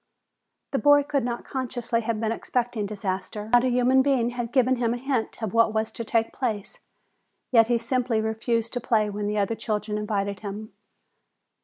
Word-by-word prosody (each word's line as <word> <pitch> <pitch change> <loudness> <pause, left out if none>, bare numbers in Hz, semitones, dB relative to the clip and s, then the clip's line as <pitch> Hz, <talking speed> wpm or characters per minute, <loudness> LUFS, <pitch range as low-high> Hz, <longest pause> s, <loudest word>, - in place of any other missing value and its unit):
The 275 - 0
boy 290 0 +6
could 280 -2 -1
not 240 0 -3
consciously 245 -2 -2
have 225 -1 -2
been 220 0 0
expecting 235 -2 -2
disaster. 200 +1 -4
Not 245 0 +6
a - - +2
human 250 +2 +4
being 260 -3 +2
had 240 -1 -4
given 255 -1 +3
him 235 -1 0
a - - -4
hint 245 -3 -2
of 210 - -2
what 230 -1 +3
was 220 0 0
to 230 - -5
take 225 0 0
place. 220 -6 -3 0.7
Yet 225 -3 +6
he 240 0 +3
simply 235 -1 0
refused 225 +1 -1
to 245 - -2
play 215 -3 +1
when 205 0 -3
the 210 +1 -1
other 205 +2 +1
children 210 -1 -2
invited 200 -2 -2
him. 210 +1 -7
230 Hz, 185 wpm, -25 LUFS, 215-245 Hz, 0.7 s, boy